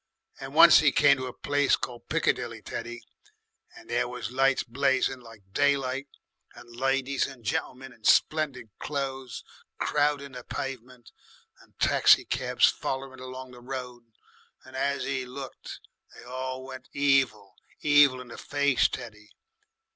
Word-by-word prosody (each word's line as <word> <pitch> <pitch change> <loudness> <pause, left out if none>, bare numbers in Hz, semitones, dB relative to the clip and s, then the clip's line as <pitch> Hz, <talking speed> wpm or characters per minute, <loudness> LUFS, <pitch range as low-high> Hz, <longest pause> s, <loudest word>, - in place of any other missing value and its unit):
And - - -8
once - - +9
'e - - +4
come 140 - +5
to 130 0 -4
a - - -5
place 145 +2 +1
called 120 -1 -7
Piccadilly, 120 -8 -1
Teddy, 120 +1 -6 0.7
and - - -15
there 120 +1 0
was 125 -3 -6
lights 135 +1 +2
blazing 130 +1 0
like 115 -4 -15
daylight 140 0 +1 0.5
and 120 0 -14
ladies 135 +1 0
and 130 -5 -13
gentlemen 130 +5 -3
in 110 - -24
splendid 135 -5 +2
clo'es 135 -3 -4 0.3
crowding 145 -1 0
the 125 -1 -9
pavement, 125 -2 -7 0.5
and - - -24
taxicabs - - +4
follering 130 -1 -5
along 130 0 -8
the 125 -1 -13
road. 125 -2 -7 0.6
And 130 0 -13
as 140 0 -1
'e 135 -1 -2
looked, 130 +1 -9 0.4
they - - -13
all 130 +1 -5
went 130 0 -10
evil 135 -8 +1 0.3
evil 145 -3 +5
in 125 - -12
the - - -9
face, 140 -4 +2
Teddy. 105 -3 -8
130 Hz, 140 wpm, -27 LUFS, 120-135 Hz, 0.7 s, once